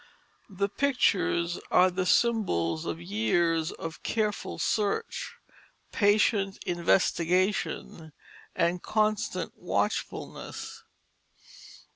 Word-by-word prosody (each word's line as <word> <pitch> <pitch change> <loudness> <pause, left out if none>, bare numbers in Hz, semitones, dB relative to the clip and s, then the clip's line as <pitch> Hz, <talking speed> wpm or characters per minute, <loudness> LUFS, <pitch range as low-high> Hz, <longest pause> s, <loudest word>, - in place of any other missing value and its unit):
The 200 0 -1
pictures 200 -8 +1
are 185 +1 +5
the 180 0 -1
symbols 85 - +1
of 85 -1 -3
years 155 - +1
of 165 -1 -7
careful 215 -2 -2
search, 455 - -1 0.6
patient 205 -1 +2
investigation, 175 -1 0 0.4
and 175 +1 +1
constant 215 -1 0
watchfulness. 455 +1 -3
185 Hz, 75 wpm, -28 LUFS, 165-215 Hz, 0.6 s, are